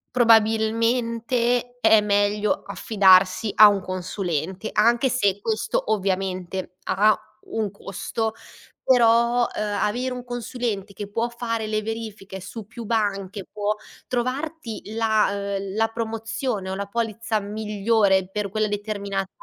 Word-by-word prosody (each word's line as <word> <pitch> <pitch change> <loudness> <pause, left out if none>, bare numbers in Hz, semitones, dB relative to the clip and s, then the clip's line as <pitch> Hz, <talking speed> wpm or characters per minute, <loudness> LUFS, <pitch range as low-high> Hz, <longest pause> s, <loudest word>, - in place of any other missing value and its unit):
Probabilmente 230 +2 +2
è 220 -2 +6
meglio 205 0 +1
affidarsi 195 0 +4
a 215 - +10
un 200 -2 +2
consulente, 185 +1 -3
anche 235 +4 +3
se 205 -6 +1
questo, 220 0 -1
ovviamente, 185 -2 -2
ha 210 +3 +4 0.3
un 220 -2 -1
costo. 220 +3 -4 0.5
Però, 235 -1 +4
ehm, 205 -1 -2
avere 250 +5 -1
un 250 -1 -6
consulente 240 -4 -4
che 205 0 -7
può 230 +3 -1
fare 230 -2 -3
le 215 0 -1
verifiche 215 -3 -6
su 215 +3 -8
più 230 +2 -9
banche 200 -3 -1
può 210 0 -1 0.3
trovarti 255 0 -3
la, 200 -3 +1
uhm, 195 0 -6
la 225 +1 +2
promozione 225 -2 -3
o 190 - -3
la 200 +1 -3
polizza 225 0 -2
migliore 205 -2 +1
per 205 0 -3
quella 215 +1 0
determinata, 200 -2 -3
215 Hz, 125 wpm, -24 LUFS, 200-230 Hz, 0.5 s, a